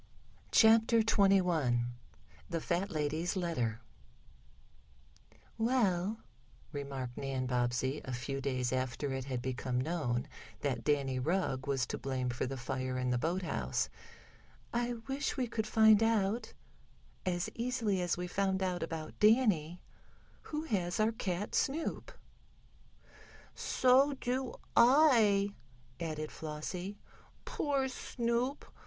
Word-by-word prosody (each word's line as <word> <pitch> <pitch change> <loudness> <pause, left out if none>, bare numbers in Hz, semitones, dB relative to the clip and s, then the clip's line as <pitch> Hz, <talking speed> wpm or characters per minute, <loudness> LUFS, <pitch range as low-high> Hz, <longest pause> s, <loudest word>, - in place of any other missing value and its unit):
CHAPTER 225 0 +6
XXI 180 - +3 0.6
THE 165 - -1
FAT 180 +4 -1
LADY'S 155 +2 -1
LETTER 125 - -1 1.8
"WELL," 220 -4 +1 0.5
remarked 135 -4 -5
Nan 135 -2 -2
Bobbsey, 125 +2 0
a 130 - -6
few 130 +3 -3
days 130 -2 -1
after 130 +2 -2
it 130 -1 -3
had 130 -3 -3
become 130 -1 -2
known 130 -5 -1 0.3
that 130 -5 -1
Danny 140 -3 +1
Rugg 140 -3 -1
was 135 -2 +1
to - - -5
blame 130 -2 -2
for 120 +2 -2
the 135 +1 -4
fire 130 0 -3
in 125 0 0
the 125 - +1
boathouse, 175 +5 -1 0.8
"I 240 +1 0
wish 275 +2 -2
we 255 - +1
could 225 -2 -3
find 220 -1 +6
out, 225 0 +1 0.7
as 175 -1 -1
easily 230 -5 -1
as 175 -1 0
we 180 - -3
found 190 +1 0
out 180 -1 -1
about 160 -1 -5
Danny, 210 -7 +3 0.7
who 305 0 -2
has 185 - -1
our 215 +1 +3
cat 205 -2 -3
Snoop." 320 - -1 1.4
"So 265 +3 +3
do 260 -1 -2 0.2
I," 235 -7 +5 0.5
added 155 -2 -4
Flossie. 175 +6 -5 0.5
"Poor 275 -3 0
Snoop! 245 +1 -2
175 Hz, 115 wpm, -33 LUFS, 135-225 Hz, 1.8 s, CHAPTER